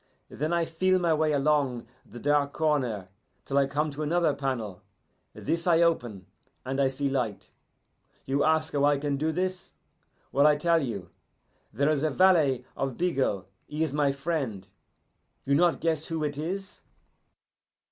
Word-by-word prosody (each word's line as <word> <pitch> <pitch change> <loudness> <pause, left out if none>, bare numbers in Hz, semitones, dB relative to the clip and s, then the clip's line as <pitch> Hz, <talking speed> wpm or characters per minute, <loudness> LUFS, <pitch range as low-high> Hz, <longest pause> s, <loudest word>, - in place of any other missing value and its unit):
Then 155 +3 -2
I 170 -1 +2
feel 185 +3 +1
my 170 -3 +2
way 155 0 +1
along 140 -4 +1 0.2
the 120 - -11
dark 145 +1 +1
corner 125 - 0 0.4
till 135 - -4
I 140 - +2
come 150 +2 -1
to 145 +2 -7
another 160 0 +2
panel. 130 -9 -3 0.5
This 165 +4 -2
I 170 -1 +5
open, 120 - 0 0.4
and 135 +1 -2
I 135 - +4
see 135 +2 -1
light. 125 -7 -2 0.7
You 140 +2 +1
ask 160 0 +2
how 145 -1 +1
I 145 0 +4
can 145 0 -1
do 155 +3 0
this? 185 +2 -3 0.6
Well, 140 +2 +5
I 150 - +5
tell 165 +2 +2
you. 100 - -5 0.6
There 140 - 0
is 150 -3 0
the 155 - +1
valet 150 -6 +3
of 135 -3 -3
Bigot, 135 - 0 0.2
he 150 +2 -2
is 155 -4 -2
my 145 -1 +2
friend. 135 - -3 0.8
You 140 - +1
not 170 +3 +3
guess 160 -2 0
who 160 -1 -2
it 145 -1 -2
is? 185 +6 -5
145 Hz, 165 wpm, -27 LUFS, 135-160 Hz, 0.8 s, I